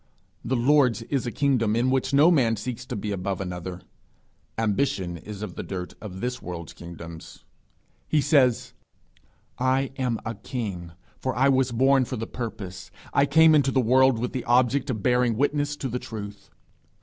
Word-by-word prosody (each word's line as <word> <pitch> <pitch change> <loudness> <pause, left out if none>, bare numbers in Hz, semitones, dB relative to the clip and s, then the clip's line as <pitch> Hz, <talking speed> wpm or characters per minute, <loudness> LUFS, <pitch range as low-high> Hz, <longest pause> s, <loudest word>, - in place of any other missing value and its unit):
The 130 - -1
Lord's 125 -3 +3
is 130 +1 -2
a - - -2
kingdom 125 -6 +1
in 125 +3 +2
which 130 0 0
no 145 +5 +6
man 120 -9 +3
seeks 115 +3 -6
to 125 - -4
be 105 0 -3
above 95 -1 -3
another: 90 -1 -5 0.8
ambition 100 -5 0
is 100 +5 -8
of 100 -5 -6
the - - -5
dirt 90 -2 -6
of 95 -3 -8
this 125 +1 -3
world's 85 -2 -7
kingdoms. 85 -1 -10 0.6
He 155 - +2
says, 135 -5 +2 0.9
'I 130 +1 +1
am 125 -3 0
a 110 - -2
king, 100 -7 -5 0.3
for 130 -1 -2
I 135 +3 +4
was 130 -2 +2
born 130 +2 +3
for 130 - -5
the 115 -1 -4
purpose, 100 -6 -7 0.2
I 140 0 +4
came 160 +3 +6
into 140 -3 +4
the 135 - +2
world 130 +1 +4
with 120 +2 -3
the 130 - -3
object 125 +3 +2
of 110 -6 -3
bearing 125 -2 +2
witness 145 +2 0
to 145 - -4
the 125 0 -3
truth. 100 -4 -8
120 Hz, 175 wpm, -25 LUFS, 100-130 Hz, 0.9 s, no